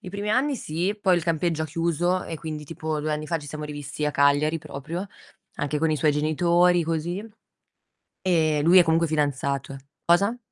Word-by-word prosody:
I 180 Hz, -, -9 dB
primi 200 Hz, +2 st, -3 dB
anni 275 Hz, +6 st, +2 dB
sì, 175 Hz, +5 st, -2 dB
poi 185 Hz, -3 st, +3 dB
il 170 Hz, -, -2 dB
campeggio 165 Hz, -1 st, 0 dB
ha -, -, -1 dB
chiuso 170 Hz, +3 st, 0 dB
e 165 Hz, -, -5 dB
quindi 155 Hz, -1 st, -6 dB
tipo 155 Hz, 0 st, -4 dB
2 155 Hz, +1 st, -1 dB
anni 150 Hz, 0 st, -3 dB
fa 165 Hz, +1 st, -1 dB
ci 145 Hz, -1 st, -10 dB
siamo 150 Hz, +1 st, -6 dB
rivisti 145 Hz, 0 st, -5 dB
a -, -, +1 dB
Cagliari 145 Hz, +3 st, +3 dB
proprio, 160 Hz, +7 st, -6 dB, 0.5 s
anche 145 Hz, +1 st, -2 dB
con 160 Hz, +1 st, +1 dB
i 155 Hz, -, +1 dB
suoi 150 Hz, +1 st, +2 dB
genitori, 170 Hz, +4 st, +3 dB
così. 165 Hz, +5 st, -2 dB, 1.0 s
Ehm, 155 Hz, -5 st, +2 dB
lui 170 Hz, +4 st, +6 dB
è -, -, +7 dB
comunque 165 Hz, 0 st, +2 dB
fidanzato, 140 Hz, -3 st, -1 dB
eh -, -, -7 dB, 0.3 s
cosa? 200 Hz, +7 st, +3 dB
160 Hz, 195 wpm, -25 LUFS, 150-175 Hz, 1.0 s, è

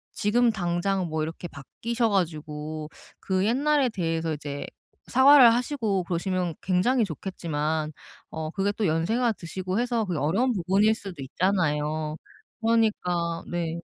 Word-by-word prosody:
지금 235 Hz, +3 st, +3 dB
당장 180 Hz, -1 st, -1 dB
뭐 155 Hz, 0 st, -1 dB
이렇게 165 Hz, +2 st, -5 dB
바뀌셔 230 Hz, -, -3 dB
가지고 155 Hz, -4 st, -2 dB, 0.3 s
그 190 Hz, 0 st, 0 dB
옛날에 275 Hz, +2 st, +2 dB
대해서 165 Hz, -5 st, -2 dB
이제 145 Hz, -1 st, -6 dB, 0.4 s
사과를 260 Hz, -1 st, +8 dB
하시고 235 Hz, -, 0 dB
그러시면 180 Hz, 0 st, -1 dB
굉장히 205 Hz, +7 st, +2 dB
좋겠지만 160 Hz, -4 st, -3 dB, 0.4 s
어 160 Hz, -1 st, -4 dB
그게 195 Hz, +2 st, 0 dB
또 215 Hz, -, -1 dB
연세가 225 Hz, +10 st, +1 dB
드시고 185 Hz, +2 st, -4 dB
해서 240 Hz, -2 st, 0 dB
그게 180 Hz, -5 st, -2 dB
어려운 200 Hz, -, +1 dB
부분일 195 Hz, +4 st, +3 dB
수도 190 Hz, -8 st, -8 dB
있잖아요. 155 Hz, -2 st, 0 dB, 0.5 s
그러니까 180 Hz, -7 st, +1 dB
네. 170 Hz, -1 st, -3 dB
185 Hz, 305 characters per minute, -26 LUFS, 160-225 Hz, 0.5 s, 사과를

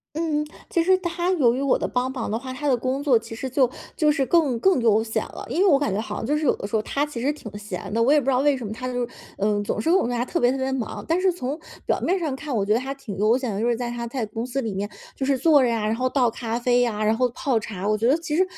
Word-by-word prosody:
嗯， 310 Hz, -2 st, 0 dB, 0.2 s
其 335 Hz, -, +1 dB
实 375 Hz, +2 st, +4 dB
他 345 Hz, 0 st, -1 dB
由 245 Hz, -8 st, +3 dB
于 270 Hz, -, -2 dB
我 275 Hz, -, +2 dB
的 -, -, -1 dB
帮 255 Hz, +1 st, -1 dB
忙 255 Hz, -3 st, -4 dB
的 215 Hz, -, -1 dB
话， 260 Hz, +2 st, -6 dB
他 295 Hz, +3 st, -5 dB
的 265 Hz, -3 st, +4 dB
工 255 Hz, +3 st, -2 dB
作 285 Hz, -4 st, +3 dB
其 225 Hz, 0 st, -3 dB
实 265 Hz, -, -4 dB
就 255 Hz, -1 st, +2 dB, 0.3 s
就 305 Hz, -2 st, +3 dB
是 275 Hz, -3 st, +1 dB
更 295 Hz, -9 st, +3 dB
更 370 Hz, -2 st, +3 dB
悠 220 Hz, -1 st, +4 dB
闲 220 Hz, -, -2 dB
了， -, -, -9 dB
因 355 Hz, -, -1 dB
为 -, -, +5 dB
我 280 Hz, -4 st, +5 dB
感 280 Hz, -10 st, -1 dB
觉 205 Hz, -, 0 dB
好 210 Hz, -1 st, -5 dB
像 225 Hz, -, -4 dB
就 295 Hz, +2 st, +1 dB
是 305 Hz, -, -1 dB
有 -, -, +3 dB
的 -, -, -5 dB
时 205 Hz, -, -9 dB
候 215 Hz, -, +2 dB
他 285 Hz, +6 st, -1 dB
其 255 Hz, -6 st, -6 dB
实 280 Hz, +4 st, +1 dB
挺 220 Hz, -8 st, -10 dB
闲 205 Hz, -2 st, -6 dB
的， 230 Hz, -, +2 dB
我 270 Hz, +5 st, +4 dB
也 300 Hz, -, +6 dB
不 -, -, -7 dB
知 275 Hz, -, +2 dB
道 255 Hz, -, +3 dB
为 285 Hz, -1 st, +3 dB
什 245 Hz, -, -6 dB
么 205 Hz, -, -5 dB
他 255 Hz, +3 st, -5 dB
就 245 Hz, -1 st, -1 dB
是， -, -, -17 dB, 0.3 s
呃， 205 Hz, 0 st, +1 dB
总 205 Hz, -, -2 dB
是 -, -, -1 dB
跟 355 Hz, -, +5 dB
我 -, -, +2 dB
说 -, -, -2 dB
他 240 Hz, -, 0 dB
特 340 Hz, -, -2 dB
别 245 Hz, -, +4 dB
特 270 Hz, -, -2 dB
别 265 Hz, 0 st, -1 dB
忙， 255 Hz, -4 st, -4 dB
但 335 Hz, +3 st, +1 dB
是 375 Hz, -1 st, +3 dB
从 280 Hz, -3 st, -4 dB, 0.3 s
表 -, -, +1 dB
面 375 Hz, +2 st, +1 dB
上 305 Hz, -6 st, -2 dB
看， 285 Hz, -1 st, -5 dB
我 200 Hz, -3 st, 0 dB
觉 210 Hz, -, +3 dB
得 235 Hz, -, +2 dB
他 270 Hz, +1 st, -4 dB
挺 235 Hz, -8 st, -8 dB
悠 220 Hz, +4 st, +3 dB
闲 250 Hz, -6 st, -3 dB
的， 200 Hz, -, -2 dB
就 235 Hz, -, +1 dB
是 235 Hz, -, +2 dB
在 245 Hz, 0 st, -3 dB
他 240 Hz, 0 st, -4 dB
在 235 Hz, -1 st, -3 dB
公 225 Hz, +2 st, -5 dB
司 255 Hz, +2 st, -2 dB
里 220 Hz, -5 st, -3 dB
面 205 Hz, +2 st, -3 dB, 0.2 s
就 265 Hz, -, -3 dB
是 275 Hz, -1 st, +1 dB
坐 295 Hz, -1 st, +5 dB
着 245 Hz, -, +3 dB
呀， 225 Hz, -2 st, 0 dB
然 220 Hz, -, +1 dB
后 255 Hz, +2 st, 0 dB
倒 255 Hz, -2 st, +2 dB
咖 230 Hz, 0 st, -3 dB
啡 245 Hz, 0 st, +2 dB
呀， 215 Hz, -3 st, 0 dB
然 220 Hz, +1 st, +2 dB
后 250 Hz, +1 st, +2 dB
泡 245 Hz, -1 st, 0 dB
茶。 200 Hz, -2 st, -5 dB
我 215 Hz, -, +3 dB
觉 230 Hz, +3 st, +1 dB
得 280 Hz, -, +5 dB
其 325 Hz, -2 st, -3 dB
实， 370 Hz, -, +4 dB
255 Hz, 360 characters per minute, -24 LUFS, 225-285 Hz, 0.3 s, 也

